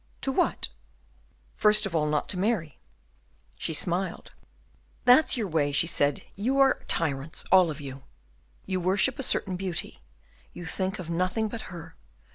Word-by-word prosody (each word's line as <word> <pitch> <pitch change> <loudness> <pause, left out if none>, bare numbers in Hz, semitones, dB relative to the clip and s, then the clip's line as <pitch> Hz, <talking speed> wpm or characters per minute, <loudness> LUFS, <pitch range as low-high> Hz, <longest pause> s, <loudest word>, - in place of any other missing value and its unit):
"To 270 - 0
what?" - - +1 0.8
"First 210 0 +3
of 185 -4 -4
all, 150 -1 +2
not 150 -1 0
to 185 - 0
marry." 185 - -1 0.8
She - - -2
smiled. 175 +3 -1 0.7
"That's 255 +3 +5
your 220 -4 -1
way," 155 -4 +1
she 145 - +4
said; 145 -4 0
"you 245 +7 0
are 270 -1 +4
tyrants 150 -2 -2
all 185 -3 +6
of 155 -1 -5
you. 135 -2 -8 0.6
You 185 -1 -1
worship 195 +9 +2
a - - 0
certain 190 -7 0
beauty, 185 -3 -4 0.5
you 175 - -8
think 190 +4 -2
of 170 -2 -6
nothing 185 +6 0
but 225 +1 -7
her. 170 -2 -10
185 Hz, 155 wpm, -27 LUFS, 160-210 Hz, 0.8 s, all